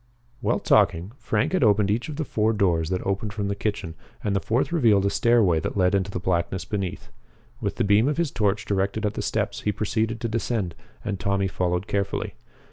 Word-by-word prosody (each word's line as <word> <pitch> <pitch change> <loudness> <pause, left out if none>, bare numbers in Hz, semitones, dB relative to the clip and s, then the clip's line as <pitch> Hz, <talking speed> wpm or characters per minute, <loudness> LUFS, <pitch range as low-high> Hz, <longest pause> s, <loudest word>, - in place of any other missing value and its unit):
While - - +1
talking, 85 +5 +2
Frank 105 -1 0
had 185 - +2
opened 105 -2 +4
each 115 +7 -1
of 150 - -5
the 155 +1 -2
four 110 -2 +1
doors 85 -6 +1
that 90 -1 -2
opened 100 +1 -2
from 100 -2 -2
the 100 - -1
kitchen, 100 -5 -3 0.3
and 100 -1 0
the - - +3
fourth 120 - 0
revealed 115 - +4
a 100 - +2
stairway 110 -8 +3
that 80 - -4
led 90 -1 +3
into 100 -1 +1
the 95 - -3
blackness 85 0 -1
beneath. 95 - -4 0.5
With - - -2
the - - 0
beam 105 +4 +4
of 150 - 0
his 170 -5 0
torch 105 0 0
directed 100 +2 0
at 105 - 0
the - - -3
steps, - - -2
he 105 - 0
proceeded 110 +2 -1
to 115 - -1
descend, 110 -5 -1 0.3
and 100 -3 -2
Tommy 100 -1 +1
followed 90 0 -1
carefully. 100 -2 -2
100 Hz, 210 wpm, -25 LUFS, 95-110 Hz, 0.5 s, opened